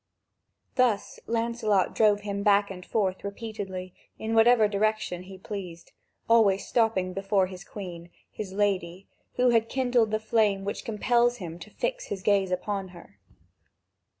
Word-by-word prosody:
Thus 235 -6 +1
Lancelot 225 -4 +1
drove 210 -2 +3
him 200 -1 -3
back 200 0 +3
and 180 -1 -8
forth 190 -2 -1
repeatedly 200 -3 -6 0.2
in 220 +1 -3
whatever 225 -1 +6
direction 210 -3 -1
he 190 +1 -11
pleased, 185 -4 -8 0.4
always 210 -4 +4
stopping 220 -6 +1
before 195 0 +1
the 185 0 -9
Queen, 175 -4 -8 0.2
his 205 -3 -6
lady, 190 -2 -1 0.3
who 250 0 +4
had 230 -1 +2
kindled 245 -4 +2
the 215 0 0
flame 215 -3 +1
which 200 - -4
compels 240 +2 +2
him 170 -5 -7
to 175 - -10
fix - - -3
his 195 -2 -5
gaze 200 -2 +3
upon 195 +2 -2
her. 170 - -15
205 Hz, 145 wpm, -27 LUFS, 190-225 Hz, 0.4 s, whatever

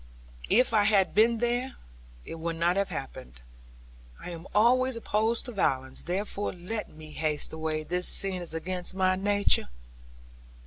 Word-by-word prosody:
'If 245 +1 +3
I 210 -2 +4
had 200 -3 +3
been 230 +2 +4
there, 245 +3 -1 0.5
it 165 - -7
would 165 +1 -3
not 170 +2 +1
have 200 0 0
happened. 130 - -7 0.8
I 180 - -7
am 170 +1 -9
always 255 +4 +4
opposed 225 0 0
to 245 - -5
violence. 130 - -1
Therefore, 200 +3 -3
let 185 +5 -5
me 155 0 -13
haste 150 -1 -2
away; 160 -1 -2
this 180 +3 0
scene 190 -2 +3
is 175 - -6
against 180 +2 -3
my 185 -1 +2
nature.' 200 - +2
185 Hz, 150 wpm, -28 LUFS, 165-215 Hz, 0.8 s, I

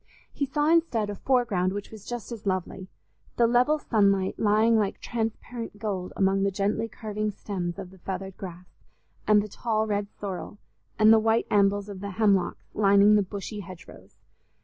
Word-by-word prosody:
He 280 - -2
saw 295 +2 0
instead 285 -11 +2
a - - -5
foreground 210 -8 +1
which 205 0 -6
was 215 -2 -12
just 240 -1 -6
as 220 -3 -7
lovely—the 185 +5 -3
level 245 +6 +3
sunlight 200 -8 +1
lying 220 +2 +3
like 210 -3 0
transparent 230 -1 -4
gold 200 -4 -3
among 195 0 +2
the 200 - +2
gently 205 +3 -1
curving 215 -2 -4
stems 190 -4 -4
of 190 -2 -8
the 190 - -17
feathered 190 +1 -5
grass 180 -1 -9 0.6
and 210 -1 +5
the - - -6
tall 220 +1 -1
red 205 -1 -1
sorrel, 200 +1 -6 0.4
and 215 +1 +7
the 225 - +6
white 225 +1 +1
ambels 200 0 +3
of 200 -2 -8
the 200 +1 -5
hemlocks 200 -3 +1
lining 200 0 +5
the 210 - +5
bushy 200 +2 -6
hedgerows. 180 -2 -12
205 Hz, 170 wpm, -26 LUFS, 195-225 Hz, 0.6 s, and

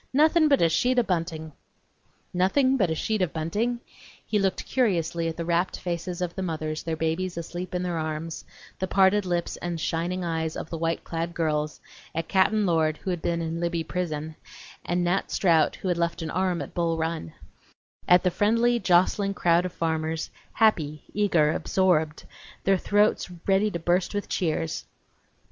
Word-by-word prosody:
Nothin; 310 +3 +5
but 280 - +4
a - - +6
sheet 250 +10 +2
o' 245 - +5
buntin!" 165 -5 -2 0.8
Nothing 255 +10 +3
but 195 -9 +2
a 160 - 0
sheet 215 +5 -1
of 180 - +1
bunting? 215 +10 -1 0.4
He 210 - +1
looked 195 -1 0
curiously 170 -9 0
at 165 - -4
the 170 - -3
rapt 170 +2 0
faces 175 +1 -3
of 175 -1 -3
the 190 - -5
mothers, 155 -3 -3
their 165 -1 -3
babies 165 +3 -2
asleep 175 +2 -5
in 180 - -1
their 175 -2 -2
arms; 155 +1 -4 0.4
the 190 - -1
parted 190 +1 +3
lips 175 -1 -1
and 175 -1 -4
shining 175 +3 -1
eyes 160 -1 -2
of - - -6
the 165 - -3
white 165 0 -1
clad 170 +1 -4
girls; 150 -2 -1 0.4
at 165 - -2
Cap'n 205 +2 +3
Lord, 160 -3 +2
who 190 - -1
had 175 -2 -3
been 170 -1 -1
in 165 +1 -3
Libby 170 -1 -1
prison, 160 -3 -3 0.5
and 175 +1 0
Nat 175 +3 0
Strout, 165 -5 +3
who - - -6
had 175 -2 0
left 170 0 -1
an 155 - -4
arm 185 -1 0
at - - -11
Bull 170 -1 0
Run; 160 - -3 0.7
at 180 0 +6
the 180 - +2
friendly, 230 +5 +2
jostling 195 +1 +2
crowd 175 0 +3
of - - -9
farmers, 160 -1 -2 0.2
happy, 155 -9 +2
eager, 175 -8 +3
absorbed, 160 -3 +1 0.4
their 195 -1 +3
throats 205 0 +2 0.2
ready 195 +2 +3
to 175 - -3
burst 175 +3 0
with 205 - -2
cheers. 160 -3 -1
175 Hz, 180 wpm, -26 LUFS, 165-190 Hz, 0.8 s, a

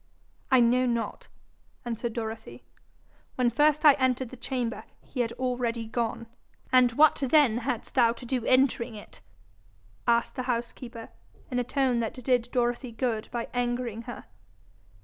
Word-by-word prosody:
'I 260 -2 +5
know 245 +2 +3
not,' 235 -1 -3 0.6
answered 235 0 -3
Dorothy. 225 -1 -6 0.7
'When 245 -2 +2
first 300 +4 +3
I 295 - +10
entered 260 -1 +1
the 255 - -10
chamber, 245 -2 -3 0.2
he 255 - -8
had 230 -2 +1
already 245 -2 -2
gone.' 230 0 -3 0.5
'And 250 -2 +5
what 300 +4 +5
then 270 -4 +3
hadst 245 -2 -4
thou 235 -3 +4
to 245 - -11
do 250 -1 -2
entering 255 -3 +2
it?' 210 - -12 0.9
asked 235 0 +2
the 255 - -3
housekeeper, 235 0 -4 0.4
in 250 - 0
a - - +1
tone 255 -1 +1
that 225 -1 -2
did 250 -2 0
Dorothy 245 0 -1
good 225 -2 -2
by 235 -1 -3
angering 245 -2 -2
her. 240 - -8
245 Hz, 150 wpm, -27 LUFS, 235-255 Hz, 0.9 s, I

